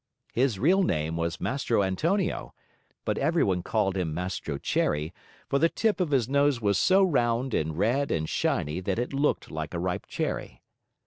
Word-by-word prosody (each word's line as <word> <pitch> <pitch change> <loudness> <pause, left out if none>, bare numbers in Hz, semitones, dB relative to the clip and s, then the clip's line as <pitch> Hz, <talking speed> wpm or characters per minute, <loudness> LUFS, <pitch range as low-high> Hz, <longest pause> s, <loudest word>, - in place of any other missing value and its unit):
His 125 -4 +1
real 180 - +4
name 80 - 0
was 85 0 -2
Mastro 120 -6 0
Antonio, 165 - -1 0.5
but - - -1
everyone 135 - +2
called 100 -1 0
him 85 -5 -2
Mastro 90 -5 -3
Cherry, 75 +3 -1 0.3
for 140 - +1
the 165 +3 +4
tip 215 -1 0
of 180 -4 +1
his 130 -6 +2
nose 140 -1 +2
was 100 -3 +1
so 195 +1 +5
round 125 -7 +1
and 80 0 -1
red 125 +9 +1
and 80 -1 -1
shiny 75 +2 -1
that 95 +2 -2
it 125 +3 -2
looked 140 +2 0
like 80 +2 -5
a - - -1
ripe 90 +1 -2
cherry. - - -4
110 Hz, 175 wpm, -27 LUFS, 85-140 Hz, 0.5 s, so